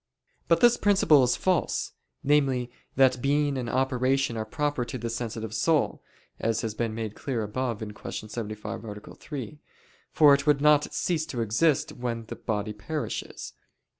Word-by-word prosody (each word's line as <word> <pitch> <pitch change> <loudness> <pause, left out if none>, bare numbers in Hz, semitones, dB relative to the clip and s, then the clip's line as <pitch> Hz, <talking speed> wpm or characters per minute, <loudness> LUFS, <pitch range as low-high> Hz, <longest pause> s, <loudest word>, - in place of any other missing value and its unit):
But - - +3
this 240 -1 +6
principle 190 -8 +5
is 125 0 +2
false 185 -3 0 0.3
namely, 135 -4 +2 0.2
that 130 -2 +4
being 145 +1 +1
and 125 -3 -3
operation 130 0 +1
are 110 -1 -3
proper 145 0 -1
to 120 +2 -5
the 115 -1 -4
sensitive 115 -2 -4
soul, 155 +6 +1 0.4
as 115 0 0
has 110 -2 -3
been 115 0 -2
made 110 -2 -4
clear 120 -1 -3
above 115 +1 -3
(Q. 105 +1 -7
75, 110 0 -6
A. 105 -2 -9
3): 145 -1 -7 0.5
for 150 -2 +7
it 140 +1 +1
would 145 -2 +4
not 150 0 +4
cease 160 -3 -1
to 125 -7 -3
exist 135 +7 +2
when 120 -2 -4
the - - -5
body 105 -1 -3
perishes. 140 +9 -5
125 Hz, 160 wpm, -27 LUFS, 110-145 Hz, 0.5 s, for